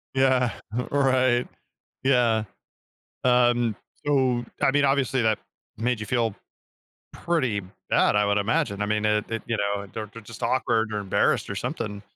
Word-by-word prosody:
Yeah. 130 -2 +3 0.4
Right. 130 -3 +2 0.6
Yeah. 120 -5 +3 0.8
Um, 120 -3 +3 0.3
so, 130 -4 +2 0.2
I 135 - +4
mean, 145 0 +3
obviously 135 -2 +1
that 110 -2 +2 0.4
made 120 0 0
you 105 - -4
feel 115 -4 0 0.8
pretty 130 -12 0 0.3
bad, - - +3
I 105 0 +3
would 100 0 +2
imagine, 100 0 0
I - - 0
mean, 105 0 0
it 105 0 +2
it, 115 - -3
you 115 -2 -1
know, 100 0 -2
they're 110 -1 -5
they're 115 - -10
just 110 +1 -11
awkward, 110 -4 +1
or 105 - -1
embarrassed, 100 -2 +1
or - - -2
something. 105 -1 -4
115 Hz, 155 wpm, -25 LUFS, 105-130 Hz, 0.8 s, I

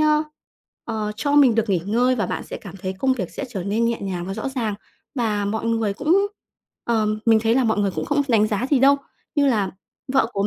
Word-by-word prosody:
ơ, 305 0 +4 0.6
ờ, 215 -2 -3
cho 285 +6 -1
mình 280 -5 +6
được 225 -1 +1
nghỉ 180 -4 +2
ngơi 245 +4 +2
và 215 - 0
bạn - - -3
sẽ - - -6
cảm 195 -2 -10
thấy 190 0 -4
công 265 -1 +2
việc 190 -9 -3
sẽ - - -5
trở 195 -7 -4
nên 210 +4 0
nhẹ 230 0 0
nhàng 185 -3 -3
và 195 - -4
rõ 220 +6 -3
ràng. 230 -6 -2 0.4
Mà 215 -5 0
mọi 220 +3 -2
người 225 -3 0
cũng 335 - +2 0.6
ờm, 215 -2 +1
mình 225 -1 +5
thấy 225 +1 +2
là 260 0 +3
mọi 220 -2 +1
người 200 -1 +2
cũng - - -2
không 290 0 +1
đánh 220 -3 +4
giá 215 +3 -1
gì 285 - +4
đâu, 275 +2 +6 0.4
như 290 -2 +3
là 210 -8 +1 0.4
vợ 270 - +4
của 200 0 0
225 Hz, 240 wpm, -22 LUFS, 205-260 Hz, 0.6 s, mình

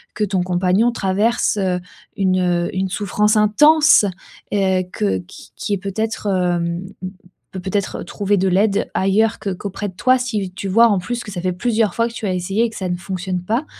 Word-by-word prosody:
que 210 - -1
ton 190 -3 0
compagnon 185 +6 +2
traverse, 210 +3 +1
heu, 185 -2 0 0.4
une 180 -2 +1
une 190 0 -1
souffrance 210 +2 +1
intense, 295 +5 +5 0.5
heu, 190 -2 +2
que 95 -2 -1
qui 90 - -13
qui 205 - -3
est - - +1
peut-être, 215 +4 -3
hem, 175 -2 0 0.7
p 190 - -6
peut-être 190 +2 -2
trouver 200 +3 -1
de 190 - +1
l'aide 200 +2 +1
ailleurs 215 +4 +2
qu 195 -2 -3
qu'auprès 200 +2 -5
de 185 - -15
toi, 255 +6 +3
si 215 -7 -3
tu 195 +1 -5
vois 230 +5 +5
en 205 - +2
plus 240 +6 -4
que 205 - -9
ça 180 - -5
fait 185 0 -1
plusieurs 220 0 0
fois 230 0 +1
que - - -13
tu 225 - -5
as 190 - 0
essayé 195 +5 0
et - - -1
que - - -12
ça 185 -2 -3
ne 175 - -1
fonctionne 180 0 -4
pas. 230 +10 -1
195 Hz, 200 wpm, -19 LUFS, 185-215 Hz, 0.7 s, intense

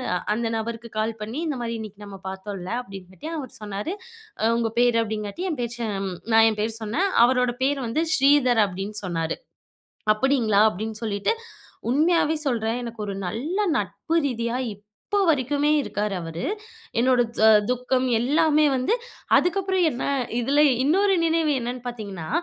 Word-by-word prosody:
அ - - +2 0.2
அந்த 230 0 -1
நபருக்கு 230 +1 -5
கால் 220 +1 0
பண்ணி 235 +9 -4
இந்த 285 -4 -2
மாதிரி 230 0 -3
இன்னைக்கு 210 -1 -9
நம்ம 195 -1 -10
பார்த்தோம்ல 190 0 -6
அப்டிங்காட்டி 195 - -9
அவரு 260 -4 -8
சொன்னாரு, 210 - -4 0.6
உங்க 225 -1 0
பேர் 240 -1 +4
அப்டிங்காட்டி 215 - -4
என் 295 - -4
பேர் 235 0 -3
ஜ - - -16 0.5
நான் 225 0 +7
என் 210 - -5
பேர் 225 +1 -2
சொன்னேன். 305 - 0 0.2
அவரோட 250 -1 +2
பேர் 275 +1 +1
வந்து 310 +8 0
"ஸ்ரீதர்" 265 -4 +4
அப்டின்னு 195 +3 -5
சொன்னாரு. 165 -3 -2 0.8
அப்டிங்களா? 225 -4 +2
அப்டின்னு 215 +3 -5
சொல்லிட்டு 205 - 0 0.6
உண்மையாவே 315 +3 +3
சொல்றேன் 230 -1 -1
எனக்கு 230 -1 -7
ஒரு 200 - -3
நல்ல 275 - -3 0.2
நட்பு 330 - -3
ரீதியா 235 -1 -2 0.2
இப்போ 210 - -5
வரைக்குமே 290 0 +2
இருக்காரு 210 -6 -2
அவரு. 165 0 -5 0.5
என்னோட 250 0 +4 0.2
து 220 - +6 0.2
துக்கம் 250 +1 0
எல்லாமே 305 +5 +3
வந்து 260 - +1 0.4
அதுக்கப்புறம் 380 0 +1
என்ன 245 - -4 0.4
இதுல 275 +5 +2 0.2
இன்னொரு 390 +6 +3
நினைவு 325 -1 +2
என்னன்னு 245 +1 -4
பாத்தீங்கன்னா, 200 -9 -6
235 Hz, 145 wpm, -24 LUFS, 210-285 Hz, 0.8 s, நான்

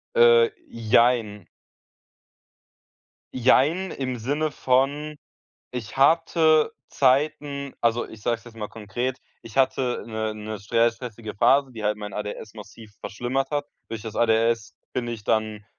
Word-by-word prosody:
Äh, 475 -1 +6 0.2
jein. 115 -3 +2 1.9
Jein, 145 +9 +3
im 130 -2 -3
Sinne 145 +6 -1
von, 140 +4 0 0.5
ich 115 -4 -6
hatte 160 +1 +4 0.2
Zeiten 140 +1 +1
also 120 0 +1
ich 110 -1 -13
sage 120 -1 +1
es 110 - -22
jetzt 115 -1 -14
mal 105 -2 -5
konkret 120 +5 -4 0.2
ich 115 +2 -12
hatte 130 -2 +1
'ne 110 -1 -3
'ne 110 0 -6
str 115 +3 +2
stressige 115 -2 -8
Phase, 135 +5 +3
die 110 - -8
halt 105 0 +1
mein 105 -1 -7
ADHS 105 +1 -6
massiv 110 0 -12
verschlimmert 130 +5 -2
hat. 145 -1 -1 0.2
Durch 115 -2 -5
das 110 -1 -7
ADHS 115 -1 +2 0.2
bin 120 -2 -2
ich 115 -3 -6
dann 110 -1 -1
120 Hz, 135 wpm, -24 LUFS, 110-140 Hz, 1.9 s, Äh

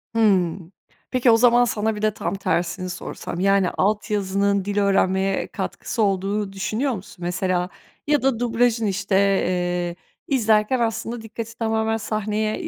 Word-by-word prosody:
Hıı. 195 -7 +3 0.6
Peki, 255 -2 +4
o 225 - +6
zaman 245 0 +5
sana 220 -1 -1
bir 210 - -6
de 215 -1 +1
tam 175 -2 -3
tersini 185 -1 -1
sorsam. 175 -1 -6
Yani, 195 -1 +3
alt 210 +3 0
yazının 200 -1 +1
dil 205 0 -3
öğrenmeye 195 -1 +2
katkısı 225 - -3
olduğunu 195 +1 -1
düşünüyor 220 +8 -1
musun? 190 -2 -9
Mesela 180 0 -1 0.4
ya 295 -1 +3
da 265 -4 +1
dublajın, 235 -1 +1
işte, 200 0 -1
eee, 180 -3 +1 0.3
izlerken 225 -1 +2
aslında 230 0 -2
dikkati 225 +1 -7
tamamen 220 -1 0
sahneye, 215 0 -1
210 Hz, 140 wpm, -22 LUFS, 190-225 Hz, 0.6 s, o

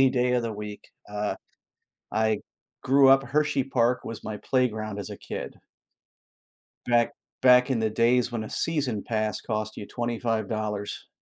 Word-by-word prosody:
any 135 - +7
day 125 -1 +1
of 120 - +2
the 115 -1 -2
week. 105 0 -7 0.2
Uh 105 0 -2 0.8
I 110 -1 +1 0.4
grew 135 +1 +5
up 135 0 +6
Hershey 145 -1 +1
Park 125 -2 +1
was 115 - -7
my 105 -1 -4
playground 110 -5 0
as 100 - -6
a - - -6
kid. - - -6 1.3
Back 120 -1 +3 0.3
back 125 0 +6
in 125 - +2
the 110 -1 +1
days 120 +2 +2
when 110 -2 -2
a - - -8
season 140 -10 -1
pass 110 -2 -1
cost 110 -1 -3
you 100 - -6
$25. 110 -3 -2
115 Hz, 155 wpm, -26 LUFS, 110-125 Hz, 1.3 s, any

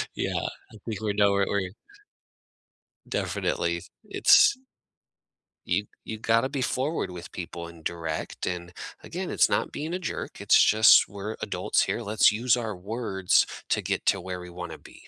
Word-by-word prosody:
Yeah. - - -2 0.4
I 110 - -13
think 110 -2 -4
we're 105 -2 -1
nowhere 100 -1 +3
where 100 - +1
y 95 - -4 1.4
Definitely, - - -1 0.2
it's 275 - +5 1.1
Y 105 - +1 0.2
you 110 - -6
gotta 115 +4 +2
be 135 -1 -3
forward 135 - -1
with 90 -1 -9
people 85 -1 -6
and 85 -1 -14
direct. 80 -2 -4
And, 90 -1 -4 0.3
again, - - -5
it's - - +4
not - - 0
being 155 +4 -4
a 185 - -2
jerk. 175 - -5
It's - - +5
just 110 +1 +6
we're 100 +2 -6
adults - - 0
here. 120 - -2
Let's 105 -1 +4
use 120 +3 +2
our 110 -3 -3
words 95 -1 +1 0.2
to - - +1
get - - -2
to 95 - +3
where 90 0 -5
we 90 0 -9
wanna 85 -3 -7
be. - - -16
100 Hz, 165 wpm, -26 LUFS, 90-115 Hz, 1.4 s, just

